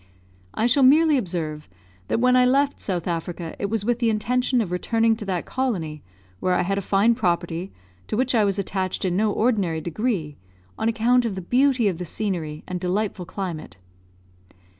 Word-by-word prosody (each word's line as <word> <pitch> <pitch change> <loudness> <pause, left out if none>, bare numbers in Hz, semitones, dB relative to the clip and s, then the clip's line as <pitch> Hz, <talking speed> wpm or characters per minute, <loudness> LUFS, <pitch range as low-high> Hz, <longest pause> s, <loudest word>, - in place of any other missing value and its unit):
I 220 - +1
shall 245 +4 +4
merely 305 +4 +6
observe 165 - -3 0.4
that - - 0
when 250 +1 +4
I 250 - +6
left 275 +3 +2
South 180 -4 -3
Africa 170 -1 -4
it 200 - -1
was 210 -1 -2
with 240 0 +1
the 235 -2 +2
intention 250 +4 +1
of 205 -6 -1
returning 225 +5 +1
to 215 - -6
that 185 -3 -2
colony, 175 - -2 0.4
where 185 -1 +1
I 180 - +2
had 195 +2 -1
a - - -4
fine 200 +4 +3
property, 175 -4 -1 0.4
to 215 - -2
which 255 +1 +1
I 225 -3 +4
was 200 -1 +1
attached 190 -1 -2
in 180 -1 0
no 210 +2 +2
ordinary 200 -8 +1
degree, 170 - -2 0.4
on 225 - 0
account 240 +2 +3
of 225 -5 -2
the 190 - -4
beauty 250 +3 +2
of 180 -4 -1
the 180 - -4
scenery 165 -5 -3
and 180 -1 -3
delightful 185 0 -2
climate. 170 - -6
200 Hz, 185 wpm, -23 LUFS, 175-235 Hz, 0.4 s, merely